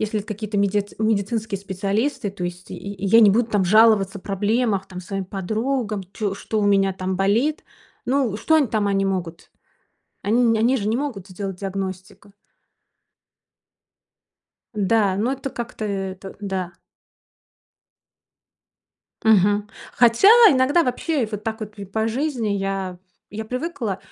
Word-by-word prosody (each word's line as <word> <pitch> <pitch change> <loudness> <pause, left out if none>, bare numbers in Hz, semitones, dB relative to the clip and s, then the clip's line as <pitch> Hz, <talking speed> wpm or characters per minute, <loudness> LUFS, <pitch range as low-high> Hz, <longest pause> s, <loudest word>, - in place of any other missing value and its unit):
если 215 0 -1
это 205 - -7
какие-то 215 -1 -4
меди 200 0 +1
медицинские 215 0 0
специалисты, 205 +6 -2
то 195 - -8
есть 175 0 -5
я 200 0 -7 0.2
я - - +8
не 210 -3 +7
буду 225 +4 +2
там 205 -4 +1
жаловаться 205 0 +4
о - - -14
проблемах 205 +1 0
там 185 -2 -9
своим 195 +1 -4
подругам, 215 +3 -2
чё 205 -3 -2
что 215 +2 -3
у 205 - +1
меня 195 -1 +3
там 185 0 -3
болит, 230 - +1 0.4
ну, 255 -5 +1
что 315 +9 +2
они 300 -3 +3
там 215 -3 0
они 195 0 +1
могут? 180 -4 -4 0.7
Они 230 +5 +2
не 230 -2 +3
они 240 +4 +3
же 210 -4 -2
не 220 - +1
могут 245 -9 -4
сделать 190 0 -6
диагностику. 195 0 -6 2.4
Да, 205 -1 +2
но 225 +6 0
это 270 0 -5
как-то 235 -3 -6
это 195 -1 -5
да. 190 -3 -3 2.5
Мгм. 205 -1 +3 0.2
Хотя 240 - +5 0.2
иногда 275 +5 +3
вообще 290 +2 -1
и - - 0
вот 210 -1 -6
так 225 0 -3
вот, 215 0 -8
и 200 - -6
по 220 +3 -2
жизни 250 -2 -1
я 195 -2 -2 0.3
я 220 +2 -5
привыкла. 250 - -3
210 Hz, 145 wpm, -22 LUFS, 195-230 Hz, 2.5 s, я